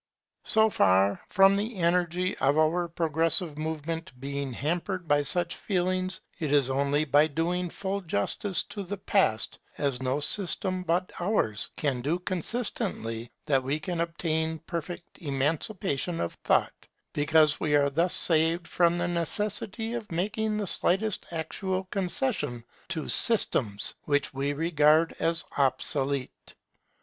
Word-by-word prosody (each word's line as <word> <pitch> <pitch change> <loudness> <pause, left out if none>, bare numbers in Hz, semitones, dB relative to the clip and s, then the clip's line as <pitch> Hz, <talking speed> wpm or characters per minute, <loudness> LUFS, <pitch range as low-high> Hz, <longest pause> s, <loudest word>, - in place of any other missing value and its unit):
So 220 0 +4
far 95 - +3
from 195 +1 +5
the 215 +3 -2
energy 180 +1 +1
of 140 +2 +2
our 165 +3 +2
progressive 165 0 0
movement 160 +1 -4
being 140 0 -4
hampered 175 - -3
by 145 -1 +3
such 175 +4 0
feelings, 185 -1 -1 0.2
it 155 -4 -2
is 140 -3 +3
only 140 +3 +1
by 145 +1 +4
doing 170 +4 -1
full 195 +3 -4
justice 175 - -1
to 205 - -5
the 200 +1 -5
Past, 185 - 0 0.2
as 135 -3 -1
no 130 +2 0
system 185 +3 0
but 180 +1 -1
ours 175 - 0
can 135 -5 -1
do 150 +7 0
consistently, 180 - -2 0.2
that 135 -3 +2
we 135 +4 -2
can 175 -1 -3
obtain 160 -1 -1
perfect 175 0 -6
emancipation 160 +3 -1
of 85 - -2
thought; - - 0 0.3
because 150 0 +3
we 150 -1 +1
are 140 -1 +3
thus 170 +5 +1
saved 165 +1 +4
from 175 -1 +2
the 175 0 -1
necessity 210 +6 -2
of 235 -5 -6
making 210 +5 -1
the 210 - -2
slightest 195 +3 0
actual 185 +3 -3
concession 180 - -1 0.2
to 160 -3 -3
systems 120 - +3
which 145 -1 0
we 140 +1 -1
regard 155 +1 +3
as 165 0 +1
obsolete. 135 0 0
165 Hz, 135 wpm, -27 LUFS, 145-185 Hz, 0.3 s, from